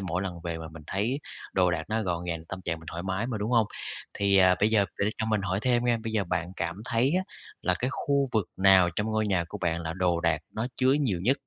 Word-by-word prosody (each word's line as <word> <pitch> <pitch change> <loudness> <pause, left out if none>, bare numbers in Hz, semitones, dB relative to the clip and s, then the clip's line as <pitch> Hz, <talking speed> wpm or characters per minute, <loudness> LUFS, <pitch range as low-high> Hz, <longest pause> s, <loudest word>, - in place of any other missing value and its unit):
mỗi 90 -1 -2
lần 90 -3 -5
về 85 -1 -3
mà 80 -1 -7
mình 80 -1 -10
thấy 115 +9 -1 0.3
đồ 90 -2 +3
đạc 85 -2 -1
nó 110 +1 0
gọn 90 -3 -2
gàng, 85 -2 -4
tâm 95 - -5
trạng 85 - -2
mình 80 - -14
thoải 85 +1 -5
mái 95 +4 -1
mà, 120 -4 -3
đúng 105 +3 -2
hông? 115 -3 +4 0.5
Thì, 100 -1 +2
à, 95 -1 +6
bây 105 - +4
giờ 105 -3 +4
để 100 +1 +2
cho 110 - -1
mình 110 -2 +1
hỏi 95 0 0
thêm 120 -2 +2
nha, 120 -1 +3
bây 110 - -3
giờ 105 -3 +1
bạn 90 0 -2
cảm 85 +4 -3
thấy 125 +3 +2
á 185 - +2 0.4
là 90 - +2
cái 125 - -1
khu 140 -1 +1
vực 110 -3 +1
nào 95 -2 +6
trong 105 - 0
ngôi 110 -1 0
nhà 95 -4 +1
của 105 - -6
bạn 85 -2 0
là 80 -1 -3
đồ 90 -2 +1
đạc 85 -2 +1
nó 110 +2 -1
chứa 130 0 +4
nhiều 105 -11 0
nhất? 130 +7 +3
95 Hz, 270 wpm, -28 LUFS, 85-110 Hz, 0.5 s, à